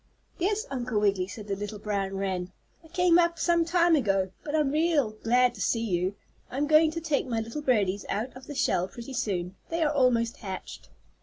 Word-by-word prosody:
"Yes, 410 +4 0
Uncle 250 -4 -1
Wiggily," 200 -3 +1
said 205 +1 -9
the 200 - -1
little 205 +1 -5
brown 200 -2 -2
wren, 185 -2 -2 0.3
"I - - -15
came 350 +1 +4
up 340 -1 +2
some 340 0 +2
time 340 0 +4
ago. 195 -8 +1
But 300 0 -3
I'm 300 -3 +2
real 305 -6 +2
glad 240 +3 +2
to - - -9
see 230 -1 +1
you. 185 -1 0 0.3
I'm 275 +3 -1
going 310 +1 +5
to 330 - -2
take 310 -5 -1
my 230 -3 -1
little 230 +7 -5
birdies 205 -8 +1
out 225 +6 -2
of 255 0 -12
the 290 - -7
shell 180 -7 +1
pretty 235 +6 -9
soon. 185 -5 -2
They 330 0 0
are 300 -1 +1
almost 240 -4 +2
hatched." 190 -4 -8
240 Hz, 205 wpm, -28 LUFS, 200-310 Hz, 0.3 s, going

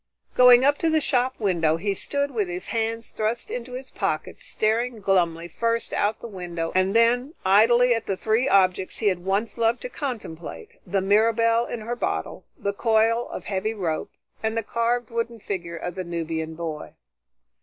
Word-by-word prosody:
Going 250 0 +7
up 285 +1 +3
to 330 - +2
the 315 0 +3
shop 260 -2 +1
window, 170 -6 +2
he 200 +4 -1
stood 280 +8 -2
with 215 -6 -1
his 180 +1 -5
hands 230 0 -2
thrust 220 +2 -2
into 245 +1 -5
his 260 +1 -7
pockets - - -3
staring 225 +2 0
glumly 175 -4 +1
first 230 +6 -1
out 215 +2 0
the - - -6
window 175 -5 -4
and 185 +2 +2
then, 245 +6 +3
idly, 235 +5 +5
at 225 -1 -3
the 195 - -1
three 225 +7 +1
objects 185 -2 +2
he 215 - +2
had 180 -2 -3
once 200 +5 -1
loved 230 +1 +2
to - - -4
contemplate, 190 - -6 0.2
the 195 -1 0
Mirabelle 230 +3 +3
in 235 - -5
her 235 +3 -3
bottle, - - -3
the 200 -6 -2
coil 225 +2 +2
of - - -7
heavy 210 +3 -2
rope, 170 -6 -2 0.3
and 220 +1 -1
the 225 - 0
carved 235 +1 -1
wooden 230 0 -3
figure 175 -5 -5
of 175 +1 -5
the 185 +1 -4
Nubian 165 -2 -4
boy. 160 -2 -6
220 Hz, 180 wpm, -24 LUFS, 185-235 Hz, 0.3 s, Going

